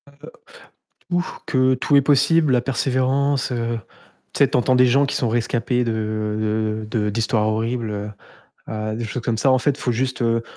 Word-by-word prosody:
Heu, - - -21 1.0
ou 175 0 +1 0.2
que 130 -1 +2
tout 145 +3 +1
est 140 - +7
possible, 145 +2 +3
la 125 - +3
persévérance, 135 +2 0
heu, 115 -1 -2 0.5
tu - - -5
sais, - - +5
tu - - +2
entends 130 +1 +2
des 125 0 +5
gens 135 +3 +3
qui 140 - -3
sont 120 - 0
rescapés 120 +2 0
de 110 -1 -2
de 110 +1 -2
de 105 0 0
d'histoires 110 0 0
horribles, 115 +1 -2
heu 105 0 -5 0.6
heu, 110 0 -4
des 115 - -4
choses 115 +3 -5
comme 115 -1 -1
ça, 135 - +3
en 130 - +4
fait, 145 - +1
il 140 - -11
faut 125 - 0
juste, 130 +1 -2
heu, 115 0 +1
120 Hz, 200 wpm, -21 LUFS, 110-130 Hz, 1.0 s, est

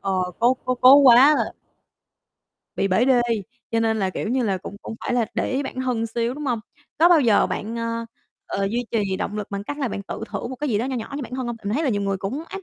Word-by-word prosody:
Ờ, 190 -2 0
cố 245 +2 +4
cố 255 0 0
cố 255 +2 +7
quá 265 -4 +8 0.2
à. - - -2 1.2
Bị 195 - +1
bể 190 +7 +3
đê, 255 -2 +4 0.5
cho 230 - +1
nên 225 -1 +1
là, 190 -2 0
kiểu 210 - -4
như 255 +1 +1
là, 195 -3 0
cũng 195 +2 -9
cũng - - -6
phải 245 - -1
là 240 -2 +2
để - - -1
ý 275 +2 0
bản 260 -1 -5
thân 245 -3 -1
xíu, 235 +2 -2
đúng 300 - -6
hông? 235 -3 0 0.4
Có 335 - +6
bao 340 -4 +6
giờ 225 -5 +4
bạn, 225 +3 -4
ờ, 230 0 -3 0.4
ờ, 195 - -2
duy 240 +2 -1
trì 200 -4 0
động 205 - -4
lực 210 -2 -5
bằng 200 0 -4
cách 290 +6 -5
là 270 -4 -1
bạn 200 - -5
tự 200 - -7
thưởng - - -4
một 260 - -6
cái 295 +1 -3
gì 210 -3 +1
đó 235 - -1
nho 265 -1 -2
nhỏ 230 +3 -6
cho 290 - -4
bản 250 - -9
thân 255 -1 -3
hông? 240 -1 -4
Tại 220 - -22
mình 205 +2 -1
thấy 310 - 0
là - - +1
nhiều 205 -3 0
người 195 -1 -1
cũng 250 - -4
áp 390 - -7
230 Hz, 285 wpm, -23 LUFS, 205-260 Hz, 1.2 s, quá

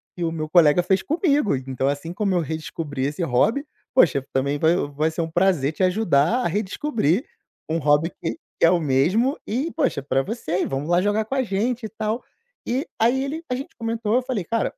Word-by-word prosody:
que 175 - -4
o 165 - -1
meu 155 -1 -4
colega 170 0 +5
fez 190 +2 +2
comigo. 295 - +1
Então, 130 0 -2
assim 145 +4 -2
como 195 0 0
eu 175 - +2
redescobri 155 -3 -4
esse 145 +5 -2
hobby, 220 - +2 0.3
poxa, 140 - +4
também 140 +2 0
vai 160 +2 +4
vai 155 +3 0
ser 165 - -3
um 160 - -2
prazer 175 -5 +2
te 185 - -1
ajudar 185 - +2
a - - +1
redescobrir 210 - 0 0.4
um 160 - +1
hobby 150 +3 +2
que 165 - -2 0.2
que - - +5
é - - +6
o 180 - +3
mesmo. 170 - +2
E, 270 +9 -1
poxa, - - 0
é - - -17
pra 135 -1 +1
você, 190 - -2
e - - -1
vamos 135 +3 -3
lá 175 +1 +4
jogar 205 +2 +1
com 265 - -3
a 265 - +2
gente 225 +3 -1
e - - -15
tal". 220 +2 -3 0.4
E 260 +6 -1
aí 245 +4 +3
ele 315 +4 -5
a - - +1
gente 265 +2 -7
comentou. 230 -1 -1
Eu 255 - +3
falei: 245 -7 -2
"Cara, 230 +4 -1
180 Hz, 220 wpm, -23 LUFS, 150-230 Hz, 0.4 s, é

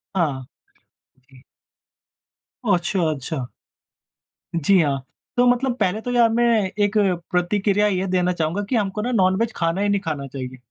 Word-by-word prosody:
हाँ, 145 -8 0 0.9
जी। 130 -1 -18 1.2
ओह! 205 - +3
अच्छा, 175 +2 -1
अच्छा। 140 -2 -4 1.1
जी, 175 +4 +3
हाँ, 140 -3 0 0.4
तो 245 - +5
मतलब 245 +1 +2
पहले 200 +1 0
तो 245 - -4
यहाँ 240 -1 +5
मैं 235 +2 +2 0.4
एक 205 +1 +1 0.3
प्रतिक्रिया 200 +3 +2
ये 190 -2 0
देना 180 -1 +1
चाहूँगा 170 +3 -1
कि 260 - +1
हमको 210 -1 -1
ना 245 +3 -2
नॉनवेज 195 +1 +2
खाना 165 +3 0
ही 205 - +1
नहीं 200 0 +2
खाना 150 -5 -4
चाहिए। 130 -1 -7
185 Hz, 150 wpm, -22 LUFS, 160-210 Hz, 1.2 s, तो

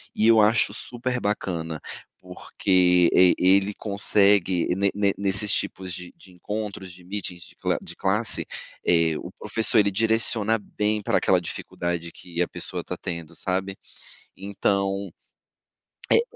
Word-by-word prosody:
e 110 - +2
eu 115 -1 +6
acho 110 +2 +3
super 125 +1 -4
bacana, 85 -6 -3 0.4
porque 90 -2 +2
e 90 -1 +6
ele 95 +2 +3
consegue 100 -3 +2
ne 100 +1 +1
ne 100 -1 +2
nesses 100 +1 +1
tipos 95 -1 -2
de 90 0 -9
de 95 - -16
encontros, 100 0 -5
de 90 0 -16
meetings, 90 -2 -5
de - - -17
cla - - -1
de - - -8
classe, 105 +4 0 0.4
eh, 85 -2 +3
o - - -8
professor 110 0 +2
ele 100 -1 +3
direciona 110 +1 +2
bem 105 +1 -2
pra - - +1
aquela - - +2
dificuldade 85 -1 -4
que 85 -1 -6
a 90 - +1
pessoa - - -3
está - - -6
tendo, 85 -2 -6
sabe, 95 +1 -2 0.6
então 100 0 -1 1.0
é - - +8
é. - - +4
100 Hz, 145 wpm, -24 LUFS, 90-105 Hz, 1.0 s, é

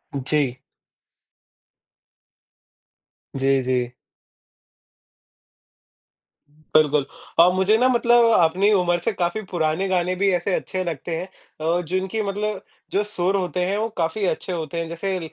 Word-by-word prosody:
जी। 135 -1 0 2.8
जी, 135 0 +2
जी। 125 -1 -1 2.6
बिल्कुल 150 -1 +1 0.3
और 175 +2 +7
मुझे 190 +4 +3
ना 250 +3 +3
मतलब 240 -1 +4
अपनी 185 +5 +3
उमर 175 -2 +2
से - - +2
काफ़ी 180 +3 -1
पुराने 165 +2 0
गाने 185 0 0
भी 200 +1 +2
ऐसे 180 +2 0
अच्छे 185 0 -3
लगते 165 -1 -4
हैं 180 - -5 0.5
अ, 180 - -1
जिनकी 185 +5 -2
मतलब 205 0 -3 0.3
जो 200 - +1
सुर 200 -2 -1
होते 180 -1 -1
हैं, 195 +2 -1
वो 220 +2 0
काफ़ी 170 +5 -1
अच्छे 185 0 -2
होते 165 -1 -4
हैं। 165 - -3
जैसे 185 +3 -3
180 Hz, 125 wpm, -22 LUFS, 160-195 Hz, 2.8 s, और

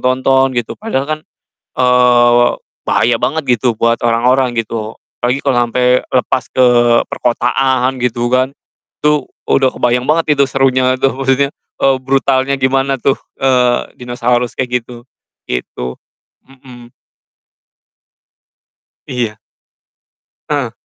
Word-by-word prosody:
tonton 130 +1 +2
gitu 120 -2 -2
padahal 210 -12 -3
kan, 155 +1 -3 0.5
eee, 125 -1 +4
wa 120 0 +4 0.4
bahaya - - +2
banget 140 -6 0
gitu 120 +1 0
buat 115 +1 +1
orang-orang 125 +2 +2
gitu 115 -1 -3 0.2
apalagi 125 +3 -1
kalo 135 -3 +2
ampe 125 +1 +2
lepas 125 -1 +1
ke 130 - +4 0.4
perkotaan 125 +1 0
gitu 120 -1 -1
kan. 130 +2 +1 0.5
Itu 150 -1 +2 0.2
udah 135 -1 +3
kebayang 125 +1 0
banget 160 0 +2
itu 140 - +4
serunya 130 -1 +2
itu 135 +1 +1
maksudnya, 135 +1 0 0.3
eee, 135 -1 +3
brutalnya 135 0 +1
gimana 135 +1 +1
tuh, 135 - +1 0.2
eee, 125 -2 +1
dinosaurus 120 0 -1
kayak 125 -1 0
gitu, 120 0 -12 0.5
gitu. 60 0 -5 0.5
Mhm. 125 -3 -15 2.2
Iya. 115 -4 -3 1.1
Heeh. - - -1
125 Hz, 115 wpm, -15 LUFS, 120-135 Hz, 2.2 s, eee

